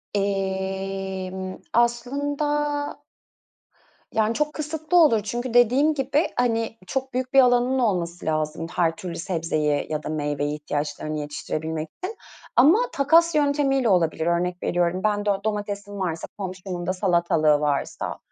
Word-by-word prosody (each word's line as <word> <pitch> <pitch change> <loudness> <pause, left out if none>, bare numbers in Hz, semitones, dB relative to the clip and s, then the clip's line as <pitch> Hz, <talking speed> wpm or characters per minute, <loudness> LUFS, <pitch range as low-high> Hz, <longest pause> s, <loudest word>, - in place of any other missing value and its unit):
Emm, 190 -1 -3
aslında 290 +5 0 1.1
Yani 220 +1 +2
çok 300 +2 -1
kısıtlı 310 +2 -2
olur. 225 -7 +4
Çünkü 240 +3 -3
dediğim 260 +6 +4
gibi 280 +3 +1
hani 230 -2 0
çok 265 +3 -3
büyük 255 +1 -2
bir 270 - +9
alanın 250 +1 +3
olması 175 -7 -1
lazım 155 +1 -1
her 165 -2 +2
türlü 180 -5 -6
sebzeyi 155 -4 -1
ya 155 0 -2
da - - -5
meyveyi 145 -1 -1
ihtiyaçlarını 150 0 -3
yetiştirebilmek 155 +2 -4 0.2
için. 430 +3 -4 0.4
Ama 300 - +7
takas 325 +4 +4
yöntemiyle 285 -4 +2
olabilir. 165 -3 +2
Örnek 175 +1 0
veriyorum 175 +1 +1
ben 205 -1 +1
do 200 -1 +1
domatesim 205 -1 -3
varsa 165 -3 -2
komşumun 185 -2 -5
da 185 - +1
salatalığı 170 -5 +2
varsa, 145 -2 -2
195 Hz, 130 wpm, -24 LUFS, 170-260 Hz, 1.1 s, bir